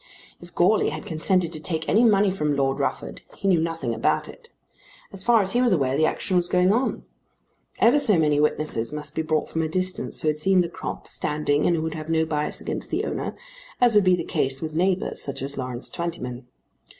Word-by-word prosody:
If 175 0 -14
Goarly 195 +4 +3
had 155 +1 -7
consented 170 +1 0
to 155 - -5
take 160 0 -4
any 220 +4 +4
money 205 -3 +4
from 150 -6 -1
Lord 135 -1 0
Rufford - - -3 0.2
he - - -3
knew 180 -4 +4
nothing 165 -7 -2
about - - 0
it. 470 -2 -14 0.6
As 190 -1 -1
far 230 -3 +4
as 190 - -2
he 245 - +1
was 245 -5 +3
aware 135 -5 +1
the 155 +2 +3
action 185 - -2
was 175 0 +3
going 180 +2 +3
on. 250 +4 -1 0.7
Ever 240 +6 +5
so 210 -9 +4
many 150 -2 +2
witnesses 150 -6 -1
must 150 -1 -6
be - - -1
brought 155 -1 -1
from 160 - -1
a 160 - -1
distance 185 +2 -2
who - - 0
had 150 0 +1
seen 185 +4 +3
the 170 - -2
crop - - -7
standing 150 0 -1
and 175 - +3
who 160 - -2
would 160 -1 -3
have 155 0 -7
no 160 0 +2
bias 150 -1 -1
against - - -4
the - - -1
owner, - - -4 0.4
as 245 -2 +4
would 210 -1 +5
be 185 -1 +4
the 170 - -4
case 135 -3 0
with 155 +1 -5
neighbours, 185 +3 0
such 140 -1 -2
as 140 +1 -3
Lawrence 125 -2 -1
Twentyman. 125 -8 -5
160 Hz, 220 wpm, -24 LUFS, 150-185 Hz, 0.7 s, Ever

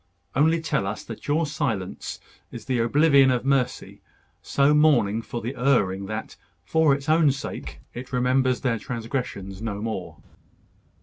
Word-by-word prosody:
Only 160 +5 +3
tell 125 -11 -1
us 105 - -4
that 115 - -9
your 155 +3 +2
silence 140 - -3 0.3
is - - -9
the 130 -2 0
oblivion 140 +3 +5
of 125 0 0
mercy, 135 -2 -1 0.4
so 140 +1 +2
mourning 130 -9 +3
for 120 +1 -6
the 120 +4 -4
erring 105 -7 +1
that, 110 +1 -6 0.3
for 160 -3 +3
its 140 +1 -8
own 155 -2 +4
sake, 135 - -7
it 125 +2 -8
remembers 130 0 +1
their 115 -4 0
transgressions 115 -5 -5
no 105 -3 -3
more." 105 -4 -5
125 Hz, 145 wpm, -24 LUFS, 110-140 Hz, 0.4 s, oblivion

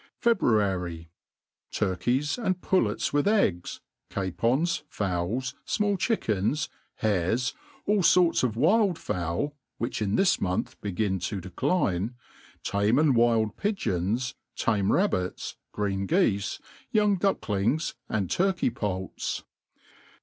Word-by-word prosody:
February. 95 - +1 0.6
Turkey8,'and 145 - 0
pullets 115 - +1
with 145 +5 +2
eggs, 195 - +1 0.3
capons, 120 - 0
fowk, 105 +7 -2
fmall 205 -2 +1
chickens, 130 - 0 0.3
hares, 110 +4 0 0.3
all 205 -1 +3
forts 175 -1 +5
of 120 -4 0
wild 185 - +3
fowl 90 - -2 0.2
(which 115 -1 -3
in 105 -1 +1
thia 195 - +4
jmontb 95 - +1
begin 100 -1 -1
to 95 +3 -3
decline), 95 - 0 0.5
tame 100 +4 +2
and 150 -3 +4
wild 115 -2 +3
pigeons, 125 - -1 0.2
tanie 105 -4 +1
rabbits^ 90 - 0 0.2
green 100 -2 -1
geefe, 110 - +1 0.3
young 210 -4 +3
ducklings, 155 - 0 0.2
and 100 -5 -1
turkey 185 -7 +2
ppults. 95 -4 -3
115 Hz, 105 wpm, -27 LUFS, -, 0.6 s, forts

